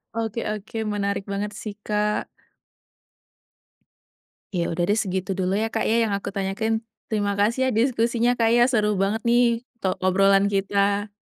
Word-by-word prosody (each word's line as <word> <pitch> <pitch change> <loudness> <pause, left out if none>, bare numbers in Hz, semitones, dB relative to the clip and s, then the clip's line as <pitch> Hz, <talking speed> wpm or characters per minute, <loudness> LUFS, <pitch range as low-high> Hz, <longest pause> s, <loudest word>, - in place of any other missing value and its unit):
Oke 225 0 -2
oke, 215 +1 -6 0.2
menarik 200 -1 -1
banget 200 +1 -2
sih, 210 -2 -7
Kak. 210 0 0 2.3
Ya 170 -1 0
udah 175 +1 -1
deh 205 - +3
segitu 190 -2 -2
dulu 190 +2 0
ya, 225 - 0
Kak, 225 0 -2
ya 230 0 +2
yang 205 - -2
aku 200 - -4
tanyakan. 200 +3 -1 0.3
Terima 205 -2 0
kasih 220 +5 +2
ya - - +2
diskusinya, 235 0 +2
Kak, 230 - +4
ya 240 - +6
seru 210 -3 +2
banget 215 +3 0
nih 240 +1 +4 0.4
to 190 - +2
obrolan 195 +1 +4
kita. 200 +1 +1
205 Hz, 155 wpm, -24 LUFS, 195-225 Hz, 2.3 s, ya